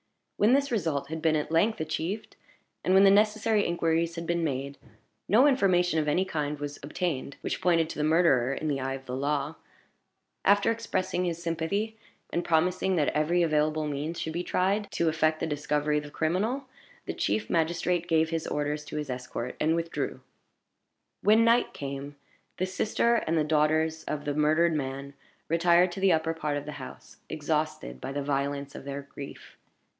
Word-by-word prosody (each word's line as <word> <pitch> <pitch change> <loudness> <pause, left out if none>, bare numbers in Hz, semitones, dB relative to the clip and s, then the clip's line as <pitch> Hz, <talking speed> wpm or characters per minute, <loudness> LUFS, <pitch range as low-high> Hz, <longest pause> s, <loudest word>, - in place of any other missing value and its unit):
When 215 +4 +4
this 280 0 +2
result 155 - -1
had 160 0 -4
been 160 -1 +3
at 150 +1 -2
length 205 +7 +2
achieved, 160 +6 -3 0.5
and 185 - +3
when 195 - +7
the 195 - +7
necessary 215 +1 +3
inquiries 165 0 0
had 170 0 -5
been 170 0 0
made, 140 -2 -3 0.5
no 230 +7 +5
information 180 - +3
of 150 - -1
any 180 +6 +2
kind 150 -4 -2
was 145 0 -5
obtained 145 -2 -3
which - - -3
pointed 165 -3 +3
to - - -7
the - - +1
murderer, 155 -6 +3
in 155 +3 -3
the 140 -2 0
eye 135 0 -2
of 135 0 -10
the 125 - -4
law. 145 +2 -1 0.9
After 205 +2 +4
expressing 190 -5 -1
his 170 -1 -2
sympathy, 175 +7 -2 0.3
and 175 - 0
promising 180 +3 +1
that 150 -4 +2
every 170 +4 +2
available 155 -1 +1
means 150 +3 -3
should 160 - -3
be 170 - -1
tried 195 +4 0
to 170 - +1
effect 155 0 +1
the - - -1
discovery 150 0 0
of 150 - -8
the - - -8
criminal, 200 - -1 0.4
the - - -3
chief 215 - -1
magistrate 170 +1 0
gave 160 -1 +2
his 165 -1 -2
orders 150 0 -2
to 150 - -6
his 150 -3 -3
escort, 125 -1 -5
and 160 +2 +2
withdrew. 165 0 -3 1.0
When 220 +2 +5
night 235 +1 +3
came, 140 +1 -6 0.4
the 185 - 0
sister 215 +5 +1
and 165 +1 +1
the 155 - +3
daughters 155 +1 +1
of 150 -1 -4
the 145 - -1
murdered 155 +3 +3
man 140 -1 -4 0.3
retired 170 +2 +4
to 175 - -6
the 190 -1 +4
upper 160 0 +1
part 150 -2 -2
of 145 - -5
the 150 - -5
house, - - -11
exhausted 155 - -2
by - - -4
the 140 0 -3
violence 140 0 -2
of - - -9
their 140 0 -5
grief. 140 0 -11
160 Hz, 185 wpm, -28 LUFS, 145-180 Hz, 1.0 s, when